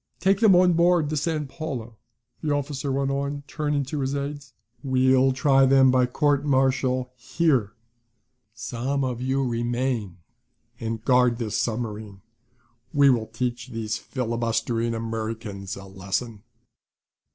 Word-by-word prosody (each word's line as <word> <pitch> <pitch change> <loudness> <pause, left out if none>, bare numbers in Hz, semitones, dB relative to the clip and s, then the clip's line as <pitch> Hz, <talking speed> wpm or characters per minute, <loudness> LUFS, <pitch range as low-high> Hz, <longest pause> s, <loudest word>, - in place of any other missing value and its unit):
Take 195 +1 +2
them 215 -5 +6
on 180 0 +5
board 170 -2 +3
the - - -1
San 155 0 -1
Paulo," 135 -6 -6 0.5
the 155 - -2
officer 145 -1 -2
went 135 0 0
on, 140 +1 -3
turning 150 -1 -1
to 145 +3 -4
his 135 +1 -1
aides. 140 -2 -5 0.3
"We'll 130 0 +3
try 135 0 +4
them 135 -1 +5
by 125 -1 +3
court 145 +2 +1
marital 130 -2 +1
here. 125 -3 0 0.8
Some 130 +5 -2
of 125 -2 -3
you 135 +1 0
remain 120 -4 -2 0.6
and 115 -1 -4
guard 125 -2 +4
this 110 -3 -3
submarine. 110 -4 -4 0.7
We 140 -1 +5
will 115 -3 0
teach 125 -1 -3
these 110 -3 -4
filibustering 115 -1 -2
Americans 110 -3 -5
a 95 - -10
lesson." 95 +3 -4
130 Hz, 130 wpm, -25 LUFS, 115-140 Hz, 0.8 s, them